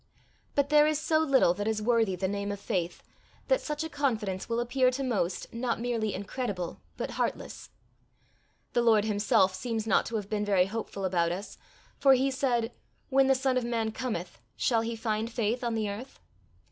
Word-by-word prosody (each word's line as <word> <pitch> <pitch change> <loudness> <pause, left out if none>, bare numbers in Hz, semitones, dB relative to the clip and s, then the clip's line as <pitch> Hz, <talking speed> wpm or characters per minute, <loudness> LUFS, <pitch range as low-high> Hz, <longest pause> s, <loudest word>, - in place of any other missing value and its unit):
But 285 -1 +2
there 300 0 +6
is 305 -1 +1
so 315 0 +2
little 275 - +4
that 205 +3 -3
is 220 -1 0
worthy 225 -3 +2
the 190 +1 -1
name 200 +1 -2
of 200 - -5
faith, 175 -3 -2 0.5
that - - +3
such 300 0 -3
a - - -2
confidence 225 - -2
will 230 0 0
appear 255 +2 +2
to 260 +2 -3
most 200 -8 -1
not 235 0 -1
merely 230 -3 -1
incredible 200 -3 -4 0.2
but - - -3
heartless. - - -3 1.0
The 240 - +3
Lord 220 -3 +4
himself 210 -2 +3
seems 225 +3 -3
not 225 - +2
to 230 - -4
have 205 -3 -2
been 210 0 -1
very 195 -3 +3
hopeful 200 -1 -4
about 170 -2 +1
us, 195 +4 -6 0.4
for 270 -1 +6
he 270 +2 +1
said, 245 -3 0 0.4
When 270 -1 +4
the 270 - +5
Son 260 0 +1
of 250 - +1
man 230 -2 -1
cometh, 215 -8 -4 0.2
shall 230 -3 +2
he 230 +1 -3
find 220 0 -2
faith 235 +1 -1
on 235 -1 0
the 215 -1 0
earth? 220 +7 -7
225 Hz, 190 wpm, -29 LUFS, 205-255 Hz, 1.0 s, there